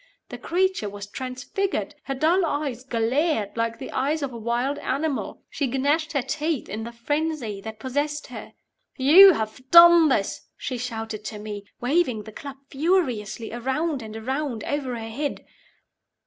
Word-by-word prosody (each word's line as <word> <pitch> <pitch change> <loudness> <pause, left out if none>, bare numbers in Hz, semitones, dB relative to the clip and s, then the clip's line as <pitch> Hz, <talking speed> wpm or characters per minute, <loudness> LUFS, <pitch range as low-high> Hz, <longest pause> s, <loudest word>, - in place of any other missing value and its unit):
The - - -7
creature 370 - 0
was 200 0 -7
transfigured! 260 - -3
Her 270 - -3
dull 330 +7 +3
eyes 285 -6 -2
glared 245 - 0
like 230 0 -1
the - - -7
eyes 290 +3 0
of 265 -3 -3
a - - -6
wild 240 +5 -1
animal. 285 +1 -2
She 280 - -2
gnashed 290 +5 0
her 280 -4 +1
teeth 305 +1 -2
in 215 +3 -5
the 235 - -6
frenzy 255 -3 -2
that 220 +1 -7
possessed 290 +5 -2
her. - - -8 0.4
"You 345 +9 +9
have 220 -2 -4
done 340 -1 +9
this!" 200 -7 -1
she 255 -2 -4
shouted 225 -3 -5
to 215 - -5
me, 205 -1 -7 0.2
waving 250 -4 +1
the 220 - -10
club 275 +5 -8
furiously 255 - 0
around 265 +4 -1
and 220 0 -7
around 260 0 -3
over 275 -4 -2
her 225 -1 -6
head. 285 +6 -4
265 Hz, 160 wpm, -24 LUFS, 225-305 Hz, 0.4 s, You